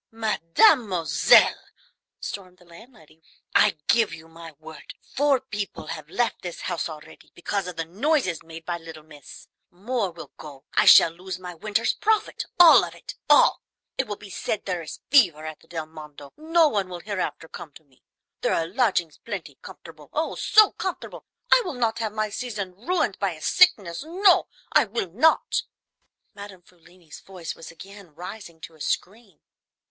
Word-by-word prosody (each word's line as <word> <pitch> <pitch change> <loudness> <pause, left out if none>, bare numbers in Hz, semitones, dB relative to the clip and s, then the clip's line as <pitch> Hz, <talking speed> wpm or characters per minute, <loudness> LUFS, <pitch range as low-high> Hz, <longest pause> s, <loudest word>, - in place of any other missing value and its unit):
"Mademoiselle," 210 - +3 0.6
stormed 185 -2 -8
the 180 - -22
landlady, 170 - -18 0.3
"I - - +4
give 230 -3 +2
you 160 0 -15
my 165 0 -12
word, 155 +1 -12 0.2
four 280 -1 +2
people 210 -9 -6
have 155 -1 -8
left 235 +4 -1
this 175 -2 -7
house 175 -2 -3
already 155 -1 -13
because 190 +2 -3
of 180 - -7
the 165 0 -3
noises 210 - 0
made 165 0 -12
by 175 -1 -3
little 160 -2 -11
miss. 150 -3 -14 0.2
More 205 +3 -3
will 170 -1 -11
go. 140 -3 -12
I - - +3
shall 165 - +8
lose 180 +2 -7
my 180 -1 -9
winter's 205 +5 -1
profit, 435 0 -1
all 345 -2 +9
of - - -7
it, - - -9 0.2
all; - - +5 0.3
it 265 - -2
will 205 - -4
be 200 -1 -13
said 210 - -4
there 180 -3 -3
is 160 - -9
fever 175 - +4
at 155 -1 -7
the - - -24
Del 160 -2 -5
Mondo, 150 -2 -13
no 325 +1 +3
one 200 -9 -1
will 175 -1 -7
hereafter 190 -4 -4
come 160 - -10
to 160 - -16
me. 135 -4 -31 0.4
There - - +1
are 165 - 0
lodgings 180 - 0
plenty, 180 - -8
comfortable, 160 -3 -13
oh, 315 +2 -1
so 430 -2 +5
comfortable! 375 -2 -6 0.2
I - - +7
will 355 -7 -5
not 230 -2 -1
have 220 -2 -2
my 215 0 -3
season 205 -6 -5
ruined 240 - -2
by 195 -3 -1
a 155 - -13
sickness; 210 - +3
no, 365 +4 +3 0.2
I 300 - +4
will 195 -4 -4
not!" 290 - +2 0.7
Madame 200 -3 -11
Frulini's 175 -2 -17
voice 180 -4 -8
was 165 - -12
again 195 -1 -14
rising 175 -1 -9
to 165 - -10
a 155 - -18
scream. 200 0 -4
185 Hz, 175 wpm, -24 LUFS, 165-230 Hz, 0.7 s, all